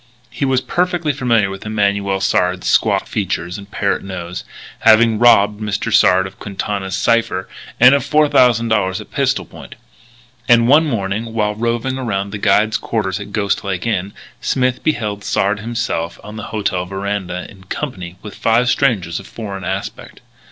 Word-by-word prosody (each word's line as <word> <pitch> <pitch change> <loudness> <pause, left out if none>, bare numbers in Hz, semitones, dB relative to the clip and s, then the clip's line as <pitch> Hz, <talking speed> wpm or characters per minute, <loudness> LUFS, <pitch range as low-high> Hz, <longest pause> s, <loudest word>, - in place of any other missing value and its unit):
He 140 - -2
was 130 -1 +2
perfectly 175 -1 0
familiar 115 -7 +1
with 95 - -8
Emanuel 100 -2 0
Sard's 90 -1 +1
squat - - +2
features 90 -2 -3
and 100 0 -12
parrot 100 -1 -1
nose, 90 -2 -6 0.4
having 110 0 +5
robbed 105 -3 +5
Mr. 105 +1 -2
Sard 95 -3 +5
of 95 0 -10
Quintana's 100 -1 -4
cipher 115 -4 +1 0.3
and 125 +3 +8
of 140 - +3
$4,000 115 -10 +3
at - - -11
pistol - - 0
point. - - -12 0.7
And 115 -1 +6
one 155 +5 +5
morning, 110 -2 -2
while 105 -2 0
roving 120 +4 -2
around 100 -5 -2
the 105 - -5
guide's 105 +2 +3
quarters 95 -5 -2
at 100 0 -8
Ghost 100 -1 -1
Lake 95 -1 -3
Inn, 100 -3 -1 0.3
Smith 130 -1 0
beheld 105 -9 -1
Sard 100 +1 0
himself 105 -7 -3
on 105 +1 -9
the 105 - -6
hotel 95 -4 -2
veranda, 95 -2 -4
in 95 -1 -16
company 95 - -5
with 105 -2 -8
five 115 +2 +2
strangers 100 - +1
of 95 - -12
foreign 100 -4 -7
aspect. 95 +2 -5
105 Hz, 160 wpm, -18 LUFS, 95-115 Hz, 0.7 s, and